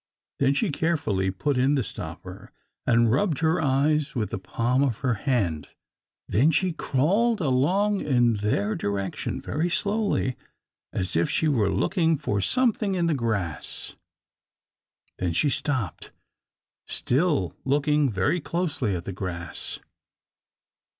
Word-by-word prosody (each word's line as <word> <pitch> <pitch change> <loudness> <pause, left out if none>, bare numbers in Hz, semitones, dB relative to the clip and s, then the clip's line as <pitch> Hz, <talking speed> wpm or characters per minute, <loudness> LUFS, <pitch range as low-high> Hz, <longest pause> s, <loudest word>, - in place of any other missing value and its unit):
Then 140 0 +3
she 190 +4 +1
carefully 145 - 0
put 125 +8 -1
in 135 +3 +3
the 135 - +1
stopper, - - -7 0.4
and 115 -2 +4
rubbed 155 - +1
her 160 +1 +2
eyes 145 +1 +1
with 110 -5 -2
the - - -3
palm 120 +7 0
of 130 -6 +1
her 125 - +3
hand. 100 - -1 0.6
Then 125 - +3
she 175 +3 +1
crawled 195 - +1
along 180 +9 +2
in 120 -4 +3
their 105 0 0
direction, 100 -1 -3
very 160 +4 -2
slowly, 200 - 0 0.5
as 90 0 0
if 85 - +2
she 160 - +1
were 115 -9 +2
looking 165 - +1
for 105 -8 -1
something 220 - +1
in 175 -2 +1
the 165 - +2
grass. 105 - -2 1.2
Then 90 -2 -1
she 145 - +2
stopped, 130 - -2 0.8
still 135 - +1
looking 145 +1 +2
very 100 - 0
closely 145 - -1
at 85 - -5
the 95 - -4
grass. 90 -3 -4
135 Hz, 130 wpm, -25 LUFS, 105-160 Hz, 1.2 s, and